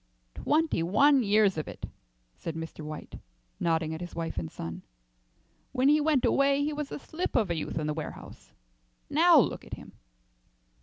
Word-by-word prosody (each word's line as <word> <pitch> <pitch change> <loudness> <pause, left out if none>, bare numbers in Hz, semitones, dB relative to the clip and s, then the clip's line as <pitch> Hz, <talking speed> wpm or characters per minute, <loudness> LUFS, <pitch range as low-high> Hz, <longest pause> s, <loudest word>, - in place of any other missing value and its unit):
"Twenty 310 - +1
one 265 - +4
years 205 -5 +3
of 155 - -5
it," - - -7 0.5
said 165 - -6
Mr. 160 -1 -7
White, 155 0 -8 0.4
nodding 160 -1 0
at 160 - -6
his 175 - -7
wife 165 - -3
and 80 -2 -6
son. 85 0 -6 0.9
"When 265 +1 +3
he 300 +1 +5
went 295 -4 +2
away 275 +1 +3
he 300 +1 -1
was 295 -1 -4
a - - -4
slip 320 +5 -5
of 215 -7 +2
a - - 0
youth 155 - -4
in 155 - -1
the 150 - -1
warehouse. 155 0 -8 0.6
Now - - +6
look - - +2
at - - -7
him." - - -13
195 Hz, 175 wpm, -28 LUFS, -, 0.9 s, Now